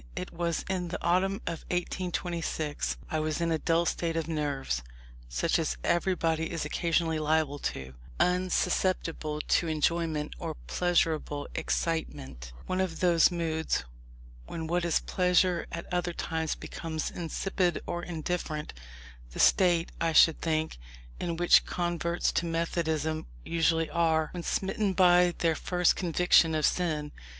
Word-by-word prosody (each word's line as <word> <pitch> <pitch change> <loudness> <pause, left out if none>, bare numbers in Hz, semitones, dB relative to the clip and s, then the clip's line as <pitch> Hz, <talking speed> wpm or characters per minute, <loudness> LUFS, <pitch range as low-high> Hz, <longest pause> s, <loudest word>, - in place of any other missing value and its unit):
It - - -5
was 170 -1 -2
in 185 -2 -2
the 170 - -3
autumn 185 +3 +2
of 165 -1 -4
1826. 170 - -2
I 155 - 0
was 155 0 -1
in 170 -1 0
a 160 - +1
dull 165 +1 +2
state 165 0 -1
of 165 -1 -2
nerves, 145 - -2 0.5
such - - +1
as - - -1
everybody 165 -3 +1
is 165 -3 -3
occasionally 165 +1 0
liable 155 -2 +1
to; 65 - -4 0.3
unsusceptible 180 -3 0
to 170 - +1
enjoyment 155 -1 0
or - - -4
pleasurable 160 - 0
excitement; 140 - -3
one 185 0 -1
of 175 -4 -2
those 170 -3 +5
moods 160 - -1 0.6
when 165 -1 -5
what 175 +2 0
is 170 - +2
pleasure 180 -1 +2
at 170 0 -5
other 175 -1 0
times, 160 -2 -2
becomes 160 -2 -5
insipid 180 +1 -1
or 175 0 -3
indifferent; 165 -2 -4 0.6
the - - -7
state, 175 -3 +4
I 165 -1 +1
should 160 0 +6
think, 160 - -1 0.4
in 170 -2 -2
which 175 +1 +5
converts 175 -1 -1
to 170 - -1
Methodism 160 -2 -1 0.2
usually 165 -1 +2
are, 160 -2 +2
when 175 - -4
smitten 195 +3 -1
by 180 -1 +5
their 165 -1 +2
first 180 +2 +1
"conviction 175 -2 +3
of 155 -2 +2
sin." 155 -4 0
165 Hz, 140 wpm, -29 LUFS, 155-175 Hz, 0.6 s, should